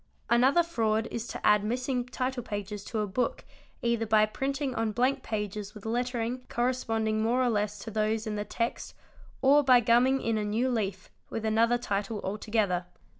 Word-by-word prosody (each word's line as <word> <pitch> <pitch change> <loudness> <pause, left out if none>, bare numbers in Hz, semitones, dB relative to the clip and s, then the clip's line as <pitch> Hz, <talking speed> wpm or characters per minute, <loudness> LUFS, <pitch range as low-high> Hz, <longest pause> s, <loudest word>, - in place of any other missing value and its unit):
Another 265 +8 +5
fraud 225 -8 0
is 235 0 -4
to - - -6
add 210 -1 +5
missing 250 +2 -1
title 255 0 -2
pages 205 -2 -5
to 220 -2 -2
a - - 0
book 230 +5 -2 0.4
either 235 -1 +1
by 215 0 +5
printing 270 +4 -2
on 225 -2 -1
blank 255 +4 +1
pages 210 -2 -4
with 210 - -11
lettering 240 +1 -2
corresponding 225 -3 0
more 240 +3 +2
or 250 - +2
less 210 -1 -1
to 215 +2 -8
those 215 +1 0
in 215 - -3
the 205 - -2
text 230 +2 -3 0.5
or 285 +2 +6
by 255 -2 +6
gumming 240 +3 +4
in 225 -3 0
a - - -1
new 220 +5 0
leaf 195 -5 -3 0.2
with 225 -1 -4
another 230 +2 +3
title 205 -2 -2
altogether. 200 -3 -1
225 Hz, 175 wpm, -29 LUFS, 210-250 Hz, 0.5 s, or